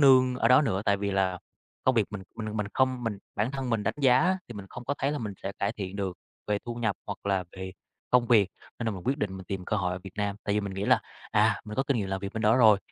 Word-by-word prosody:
nương 130 -2 +6
ở 115 - +3
đó 130 +4 +7
nữa. 95 -7 0
Tại 100 - +3
vì 100 0 -2
là 95 -2 +1 0.5
công 130 - +4
việc 110 -4 +3
mình 105 -2 -5
mình 110 -1 -4
mình 105 - 0
không 130 -2 +2
mình 110 -3 -2 0.2
bản 105 +5 +1
thân 135 -3 -3
mình 115 -2 +1
đánh - - 0
giá 155 +8 +4
thì 120 - -8
mình 100 -2 -7
không 120 - -8
có 140 - -1
thấy 140 +2 +1
là 150 - -2
mình 105 -4 -4
sẽ 100 - -3
cải 100 - 0
thiện 95 -1 -5
được 95 -3 -3 0.3
về 105 -1 +1
thu 120 - -3
nhập 115 -4 0
hoặc 100 0 -6
là 95 -2 +1
về 95 0 -6 0.4
công 125 -1 +5
việc. 110 -5 +5 0.3
Nên 115 - -3
là 110 - +2
mình 95 -3 -7
quyết 135 +4 +1
định 95 -5 -2
mình 95 - -8
tìm 95 0 -4
cơ 105 - 0
hội 90 -3 0
ở 90 - -3
Việt 95 - -8
Nam. 100 -1 -1
Tại 100 - +1
vì 105 - +2
mình 100 -2 -4
nghĩ 100 +1 -2
là, - - +5 0.3
à, - - +3
mình 105 0 -6
có 135 - +3
kinh 135 -2 +1
nghiệm 100 -3 -2
làm 95 0 -2
việc 100 0 -5
bên 110 - -2
đó 110 +2 +5
rồi 110 -5 +7
105 Hz, 300 wpm, -28 LUFS, 100-125 Hz, 0.5 s, đó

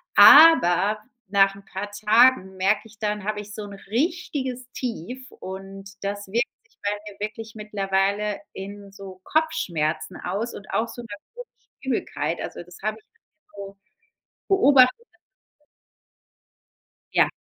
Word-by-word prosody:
Aber 215 - +8 0.3
nach 195 0 +3
'n 200 0 -15
paar 195 +1 -6
Tagen 215 -1 +4
merke 200 +3 +2
ich 220 -1 -19
dann, 210 -1 -2
habe 210 0 -2
ich 205 0 -11
so 215 - -6
'n 205 -1 -9
richtiges 255 - -3
Tief 250 +2 -6
und 195 +1 -9
das 200 0 -4
wirkt 235 +6 0 0.2
sich 460 - -33
bei 205 - 0 0.2
mir 195 - -19
wirklich 215 +1 -6
mittlerweile 200 0 -1
in 200 +1 -9
so 195 -1 -11
Kopfschmerzen 170 - -1
aus 205 +6 -3
und 195 - -11
auch 225 - 0
so 230 +1 -9
in 235 - -11
'ner 205 -1 -8 0.2
komischen - - -11 0.3
Übelkeit. 265 -2 -2
Also, - - -6
das 180 +1 -15
habe 215 +1 -1
ich - - -30 0.5
so 200 0 -9 0.7
beobachtet. 285 - +5 2.1
Ja. - - +4
210 Hz, 140 wpm, -24 LUFS, 195-240 Hz, 2.1 s, Aber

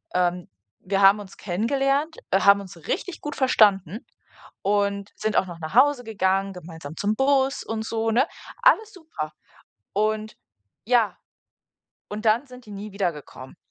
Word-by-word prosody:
ähm, 180 0 0 0.4
wir 195 +1 0
haben 195 +2 +7
uns 200 -2 -10
kennengelernt, 275 - 0 0.2
haben 200 +1 +5
uns 195 -1 -11
richtig 370 - -3
gut 295 - -5
verstanden. 210 - +3 0.6
Und 200 0 0
sind 215 0 -1
auch 190 - +2
noch 170 -2 -9
nach 160 +4 -7
Hause 265 0 +4
gegangen, 195 -2 0
gemeinsam 165 -4 -10
zum 205 +1 +1
Bus 270 +1 +2
und 225 -1 -3
so, 225 0 -1
ne? 250 +6 +3 0.4
Alles 440 -3 +4
super. 315 - -7 0.6
Und, 215 +1 0 0.5
ja. 235 -2 +2 0.9
Und 215 +2 -6
dann 230 +6 +3
sind 250 -2 -14
die 210 - -12
nie 205 +1 -7
wiedergekommen. 165 -9 -5
210 Hz, 145 wpm, -24 LUFS, 195-250 Hz, 0.9 s, haben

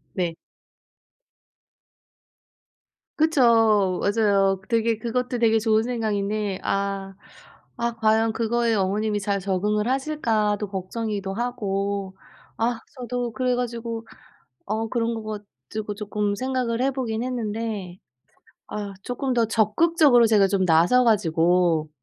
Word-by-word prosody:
네. 175 -3 -1 2.8
그쵸. 225 - +4
맞아요. 200 -2 +2
되게 230 -1 +1
그것도 245 +2 -2
되게 225 -1 +4
좋은 220 0 +2
생각인데 210 -4 -2
아 195 -1 -2 0.6
'아 235 0 -1
과연 220 0 +2
그거에 230 +1 0
어머님이 205 +2 0
잘 200 0 -1
적응을 205 +3 0
하실까.'도 225 -7 0
걱정이기도 195 +1 -4
하고 200 -4 -2 0.4
아 230 0 -1 0.2
저도 245 -1 -3
그래 250 +2 0
가지고 235 -2 -4 0.6
어 220 +2 -2
그런 235 -1 0
거 215 -1 -5 0.3
가지고 215 -1 -4
쪼끔 205 -1 -2
생각을 250 0 -1
해 270 +1 +2
보긴 235 -4 -3
했는데 220 -6 -4 0.7
아 205 -1 -5
쪼끔 255 +1 -2
더 235 -2 +3
적극적으로 245 - +4
제가 210 -3 +4
좀 190 -1 +1
나서 175 +10 +4
가지고 170 -6 +2
220 Hz, 240 characters per minute, -24 LUFS, 200-235 Hz, 2.8 s, 그쵸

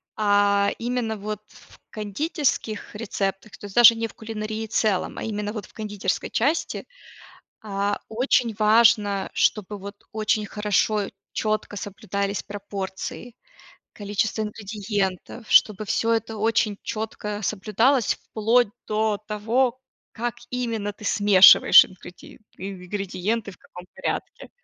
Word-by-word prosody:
а 205 -1 +3
именно, 235 -2 -2
вот 210 +1 -5
в - - -19
кондитерских 225 - -2
рецептах, 195 -2 -3
то - - -11
есть, 200 - -10
даже 235 -1 +9
не 225 0 -2
в - - -17
кулинарии 220 0 -5
целом, 215 -3 0
а - - -5
именно, 210 -1 -3
вот 210 -4 -6
в - - -24
кондитерской 210 -2 -3
части, 310 +7 0 0.8
а, 200 -1 -1
очень 235 0 +1
важно, 210 -2 +4
чтобы, 210 -1 0
вот, 200 +1 -8 0.2
очень 215 0 0
хорошо, 210 0 0 0.2
чётко 215 -1 -2
соблюдались 200 0 -3
пропорции, 200 +3 -6 0.6
количество 210 +1 -1
ингредиентов, 205 0 -4
чтобы 215 0 +4
всё 230 +3 +1
это 225 -1 -1
очень 220 -1 +1
чётко 210 -1 -4
соблюдалось. 215 +5 +1
Вплоть 225 +1 +1 0.2
до 215 0 0
того, 235 +4 0 0.3
как 240 +1 -3 0.2
именно 230 -5 -2
ты 210 - -14
смешиваешь 205 -3 +8
ингреди 180 -1 -13 0.2
ингредиенты, 195 +3 -3
в - - -16
каком 180 0 -13
порядке. - - -4
210 Hz, 120 wpm, -24 LUFS, 200-225 Hz, 0.8 s, даже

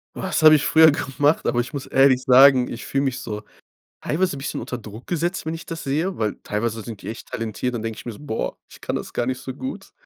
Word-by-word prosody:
Was - - -2
habe 155 0 +9
ich 145 - +1
früher 160 0 +7
gemacht? 145 +2 0
Aber 120 - +1
ich 120 +4 -3
muss 140 - -5
ehrlich 135 -1 +4
sagen, 130 0 +6
ich 120 - -7
fühle 140 0 0
mich 130 -1 -1
so 105 -2 -5 0.6
teilweise 165 -2 0
'n - - -7
bisschen 140 - -4
unter 125 - -5
Druck 110 +1 -11
gesetzt, 175 0 -2
wenn 160 - -2
ich 165 - -7
das 165 -1 -6
sehe, 160 +7 -1
weil 110 -1 -1
teilweise 110 +1 -2
sind 110 -2 -8
die - - -6
echt 115 - -8
talentiert. 115 +2 -3
Dann 115 - -3
denke 115 -1 -4
ich - - -10
mir 120 - -5
so: - - -13
„Boah, 125 -7 -3
ich - - -15
kann - - -3
das - - -5
gar 120 - -1
nicht 130 0 -2
so 130 - -6
gut.“ 260 - -7
130 Hz, 255 wpm, -22 LUFS, 115-150 Hz, 0.6 s, habe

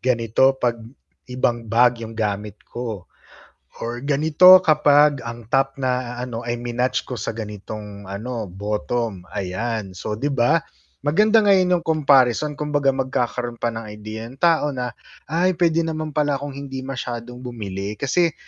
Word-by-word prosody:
Ganito 125 +2 +2
'pag 120 -2 0 0.5
ibang 120 -2 -1
bag 120 +1 +3
'yong 115 0 -7
gamit 105 -1 -2
ko. 115 -6 -6 0.8
Or 120 +1 -3
ganito 155 +6 +7
kapag 150 -3 +4
ang 115 -1 -7
top 135 +1 +1
na 125 -2 -1
a 125 - -3
ano 120 -1 -5
ay 120 0 -2
minatch 120 +1 -1
ko 125 - -4
sa 105 - -3
ganitong 105 -1 -8
ano, 110 +3 -5
bottom." 105 0 -3
Ayan. 100 +1 -3
So, 105 +4 -4
'di 145 +5 -1
ba? 125 +6 +3 0.4
Maganda 210 +9 +4
ngayon 185 -3 +4
'yong - - -13
comparison 145 -2 +3
kumbaga 145 -2 +1
magkakaroon 125 -2 -2
pa 120 - 0
ng 115 -1 -6
idea 110 +1 -7
yung 120 - -11
tao 160 -4 +2
na, 125 -1 -3 0.4
"Ay, 180 +3 +2
puwede 165 -1 +2
naman 155 -1 -3
pala 145 -1 +1
akong 140 +1 -4
hindi 135 -1 -6
masyadong 125 -2 -5
bumili." 105 -5 -5
Kasi 155 - +1
125 Hz, 155 wpm, -22 LUFS, 115-145 Hz, 0.8 s, ganito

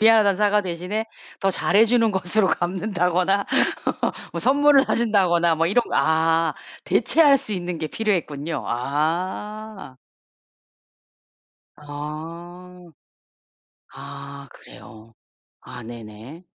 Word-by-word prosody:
미안하다는 215 -3 +5
사과 210 +1 +2
대신에 185 +5 -4 0.3
더 195 - +2
잘해주는 225 +5 +3
것으로 190 +2 +1
갚는다거나 185 +1 0 0.9
뭐 - - -4
선물을 285 0 +4
사준다거나 185 -9 +2
뭐 165 - +1
이런 210 +8 +2
거. - - -14
아 160 0 +2 0.3
대체할 295 -4 +4
수 265 -5 -2
있는 180 -3 -4
게 155 - -3
필요했군요. 165 -7 -2
아. 175 - -3 1.8
아. 165 +5 -9 1.1
아 140 0 -9
그래요. 110 +2 -15 0.5
아 125 - -10
네네. 115 - -11
180 Hz, 210 characters per minute, -22 LUFS, 155-210 Hz, 1.8 s, 미안하다는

